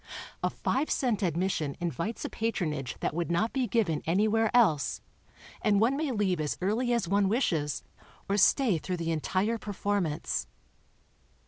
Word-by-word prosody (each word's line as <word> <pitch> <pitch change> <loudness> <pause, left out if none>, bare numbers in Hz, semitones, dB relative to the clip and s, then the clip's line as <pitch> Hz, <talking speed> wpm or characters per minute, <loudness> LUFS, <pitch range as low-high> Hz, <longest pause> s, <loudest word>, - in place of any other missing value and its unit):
A - - +1
five 285 +4 -1
cent 240 -5 0
admission 170 -4 0
invites 175 +5 -3
a - - -2
patronage 155 - -2
that - - -1
would 170 +1 -2
not 175 +7 +1
be 260 -2 0
given 190 -8 +1
anywhere 215 +5 +3
else, 210 - +3 0.6
and 205 -2 +3
one 235 +5 +3
may 305 0 -1
leave 195 -7 0
as 150 - -2
early 220 +7 0
as 235 -7 +1
one 200 +1 +2
wishes, 165 - 0 0.4
or 200 - +1
stay 210 - +4
through 180 +3 -3
the 165 -1 -2
entire 190 +8 0
performance. 200 -6 -2
200 Hz, 150 wpm, -29 LUFS, 165-225 Hz, 0.6 s, stay